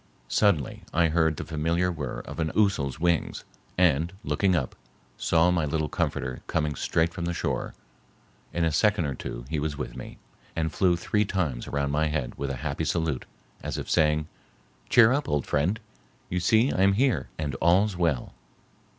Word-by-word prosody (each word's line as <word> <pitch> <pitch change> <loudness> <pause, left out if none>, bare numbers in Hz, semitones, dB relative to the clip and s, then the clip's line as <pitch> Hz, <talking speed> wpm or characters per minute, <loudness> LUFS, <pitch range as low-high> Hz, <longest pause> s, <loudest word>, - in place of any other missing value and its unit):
Suddenly, 90 - +2
I 85 0 +3
heard 80 -1 +2
the - - -4
familiar 85 +3 0
whir 75 -6 -4
of - - -9
an 80 -1 0
ousel's 90 -10 +1
wings, 85 -1 0 0.3
and, 85 -2 +3
looking 95 -4 +1
up, 70 -6 -1 0.4
saw 85 +1 +3
my 85 -3 +1
little 75 0 -1
comforter 65 - -2
coming 75 -2 0
straight 80 +4 0
from 85 - -4
the 85 0 -2
shore. - - -2 0.8
In 85 -1 0
a 80 - +1
second 100 +2 +2
or 70 - -2
two - - -6
he 80 +1 -2
was 75 -1 -2
with - - -5
me, - - -8 0.4
and 80 -2 -1
flew 90 0 +3
three 105 +4 +1
times 85 -12 -2
around 70 -1 -1
my 75 +2 +2
head 75 -5 -2
with 70 - -3
a 70 - -2
happy - - -1
salute, 80 -6 -1 0.4
as - - -4
if - - -5
saying, 75 0 +2 0.6
"Cheer 120 -2 +7
up, 145 +1 -1
old 75 -2 0
friend, 85 +10 0 0.5
you 90 - -1
see 110 +8 +3
I 95 - 0
am 100 0 +5
here 100 - +1
and 75 -3 -2
all's 95 +4 +4
well." 80 -8 0
80 Hz, 180 wpm, -27 LUFS, 75-90 Hz, 0.8 s, Cheer